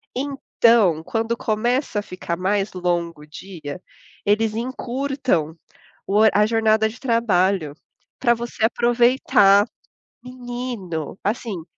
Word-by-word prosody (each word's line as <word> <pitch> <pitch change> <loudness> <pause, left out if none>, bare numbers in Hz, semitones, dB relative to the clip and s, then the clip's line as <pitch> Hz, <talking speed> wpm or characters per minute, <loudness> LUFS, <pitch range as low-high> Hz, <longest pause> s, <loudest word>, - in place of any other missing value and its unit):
Então, 235 - +2
quando 225 +4 -2
começa 235 +1 -1
a - - -2
ficar 185 -3 -5
mais 195 +2 -1
longo 170 -3 -2
o 150 - -14
dia, 160 0 -8 0.5
eles 215 +1 +1
encurtam 250 - -2 0.5
o 210 +2 +3
a 210 +1 +4
jornada 220 -1 +2
de 225 +3 -12
trabalho 195 - +1 0.5
pra 240 -2 +4
você 235 -1 -4
aproveitar, 235 -4 +4 0.6
menino, 245 - -6
assim. 210 -5 -3
220 Hz, 105 wpm, -22 LUFS, 185-240 Hz, 0.6 s, a